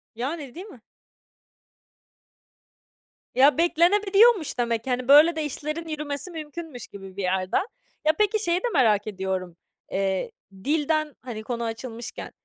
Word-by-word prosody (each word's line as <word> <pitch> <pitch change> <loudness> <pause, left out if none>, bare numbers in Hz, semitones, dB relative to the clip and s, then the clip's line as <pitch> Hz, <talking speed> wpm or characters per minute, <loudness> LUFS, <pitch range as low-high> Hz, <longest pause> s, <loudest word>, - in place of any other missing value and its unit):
Yani, 275 +2 -4
değil 365 +4 -7
mi? 255 - -14 2.5
Ya 270 +1 +5
beklenebiliyormuş 390 - +4
demek. 235 0 -1
Hani 250 0 -1
böyle 305 +4 +7
de, 310 -1 -2
işlerin 305 +3 -4
yürümesi 300 +2 -4
mümkünmüş 310 -4 -7
gibi 195 -1 -11
bir 200 - -4
yerde. 185 0 0 0.5
Ya, 310 - +5
peki, 425 +1 +2
şeyi 340 +1 +2
de - - -1
merak 220 -7 +3
ediyorum. 190 -3 -3 0.4
Eee, 190 -1 -1 0.3
dilden 310 0 0
hani 230 -4 -7
konu 235 0 -3
açılmışken, 230 +1 -6
280 Hz, 125 wpm, -25 LUFS, 225-325 Hz, 2.5 s, böyle